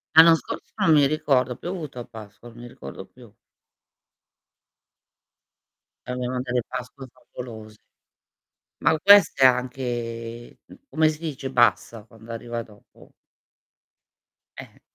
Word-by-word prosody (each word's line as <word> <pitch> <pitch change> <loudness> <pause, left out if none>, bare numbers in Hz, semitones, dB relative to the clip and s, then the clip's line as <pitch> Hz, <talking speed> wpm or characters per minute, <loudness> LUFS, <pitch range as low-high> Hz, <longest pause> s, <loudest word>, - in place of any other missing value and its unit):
L'anno 165 0 +9
scorso - - -8
non 165 - +2
mi 145 -2 +5
ricordo, 135 -5 0
più 175 - -7
ha - - -3
piovuto 155 -8 -7
a 120 - -6
Pasqua, 110 +1 -13
non 120 +1 -15
mi 120 - -9
ricordo 125 -6 -10
più. 120 -4 -18 2.7
Abbiamo 125 0 -3
delle 125 -1 -1
pasque 130 +1 -8
favolose. 110 -4 -11 1.0
Ma 160 - +3
queste, 195 -9 +6
anche 120 -2 -2 0.3
come 155 -6 +2
si 155 0 -6
dice 140 -5 -5
bassa 115 -2 +1
quando 115 +1 -14
arriva 115 0 -5
dopo? 105 -2 -20 1.5
Eh, - - -7
è - - -25
125 Hz, 120 wpm, -24 LUFS, 115-140 Hz, 2.7 s, L'anno